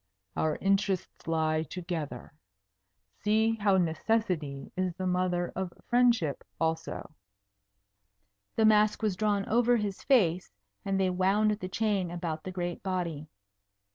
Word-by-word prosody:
Our 155 Hz, -1 st, +1 dB
interests 195 Hz, -3 st, 0 dB
lie 155 Hz, -1 st, +1 dB
together. 160 Hz, -6 st, -5 dB, 0.9 s
See 220 Hz, +2 st, +2 dB
how 200 Hz, -2 st, +3 dB
Necessity 165 Hz, -4 st, -1 dB
is 185 Hz, -2 st, -1 dB
the 185 Hz, 0 st, -4 dB
mother 180 Hz, -1 st, 0 dB
of 190 Hz, -1 st, -3 dB, 0.2 s
Friendship, 240 Hz, -, +3 dB, 0.2 s
also." 160 Hz, -1 st, -2 dB, 1.4 s
The 220 Hz, -, +3 dB
mask 215 Hz, 0 st, +4 dB
was 210 Hz, -4 st, +1 dB
drawn 205 Hz, 0 st, +1 dB
over 240 Hz, +2 st, +3 dB
his 205 Hz, -3 st, -3 dB
face, 185 Hz, -, +3 dB, 0.3 s
and 195 Hz, -1 st, 0 dB
they 190 Hz, -1 st, +2 dB
wound 195 Hz, +4 st, +2 dB
the 205 Hz, -3 st, -4 dB
chain 200 Hz, -3 st, 0 dB
about 170 Hz, -2 st, -4 dB
the 185 Hz, -, -4 dB
great 175 Hz, -1 st, -4 dB
body. 170 Hz, -5 st, -3 dB
185 Hz, 125 wpm, -29 LUFS, 165-210 Hz, 1.4 s, mask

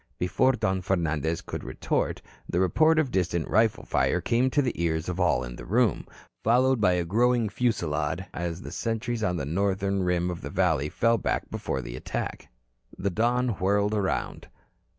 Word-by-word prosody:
Before 110 Hz, +9 st, +2 dB
Don 95 Hz, -6 st, 0 dB
Fernandez 85 Hz, -3 st, -1 dB
could -, -, -6 dB
retort, -, -, -2 dB, 0.3 s
the 90 Hz, -, 0 dB
report 155 Hz, -, +4 dB
of 150 Hz, -5 st, +2 dB
distant 90 Hz, -4 st, 0 dB
rifle 110 Hz, 0 st, +2 dB
fire -, -, +1 dB
came 125 Hz, +2 st, +1 dB
to 145 Hz, -, +2 dB
the 125 Hz, -, -1 dB
ears 80 Hz, -1 st, 0 dB
of 90 Hz, 0 st, -3 dB
all 90 Hz, -8 st, +2 dB
in -, -, -7 dB
the -, -, -8 dB
room, 110 Hz, +2 st, +1 dB, 0.4 s
followed 125 Hz, +2 st, +3 dB
by 90 Hz, -3 st, +4 dB
a 90 Hz, -1 st, 0 dB
growing 120 Hz, +4 st, +2 dB
fusillade 85 Hz, -8 st, -1 dB
as 85 Hz, +2 st, -4 dB
the -, -, -7 dB
sentries 115 Hz, 0 st, -2 dB
on 90 Hz, -4 st, 0 dB
the 70 Hz, -, -3 dB
northern 95 Hz, +4 st, 0 dB
rim 90 Hz, -1 st, 0 dB
of 85 Hz, -, -6 dB
the -, -, -6 dB
valley 80 Hz, -6 st, +1 dB
fell 115 Hz, +4 st, +2 dB
back -, -, -2 dB
before -, -, -3 dB
attack. 60 Hz, -1 st, -5 dB, 0.5 s
The 100 Hz, +1 st, -1 dB
Don 120 Hz, +5 st, +1 dB
whirled 100 Hz, +2 st, +2 dB
around. 100 Hz, -3 st, -2 dB
95 Hz, 170 wpm, -27 LUFS, 85-115 Hz, 0.5 s, report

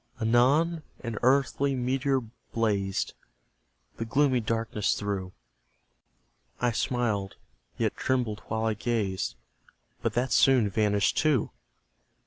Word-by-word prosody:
Anon, 135 Hz, +9 st, +3 dB, 0.2 s
an 115 Hz, -2 st, -4 dB
earthly 135 Hz, +2 st, +2 dB
meteor 130 Hz, +2 st, 0 dB, 0.3 s
blazed 100 Hz, -4 st, 0 dB, 0.8 s
The 115 Hz, -, -3 dB
gloomy 135 Hz, +2 st, +2 dB
darkness 115 Hz, -1 st, -1 dB
through; 100 Hz, -3 st, -3 dB, 1.3 s
I 120 Hz, -1 st, +2 dB
smiled, 110 Hz, -5 st, -1 dB, 0.4 s
yet -, -, 0 dB
trembled 120 Hz, -5 st, -1 dB
while 110 Hz, 0 st, -1 dB
I 110 Hz, -, +2 dB
gazed 105 Hz, -, -2 dB, 0.7 s
But -, -, -1 dB
that 125 Hz, +1 st, 0 dB
soon 120 Hz, -4 st, +4 dB
vanished 105 Hz, -1 st, +2 dB
too! 145 Hz, -7 st, +2 dB
115 Hz, 105 wpm, -28 LUFS, 105-130 Hz, 1.3 s, soon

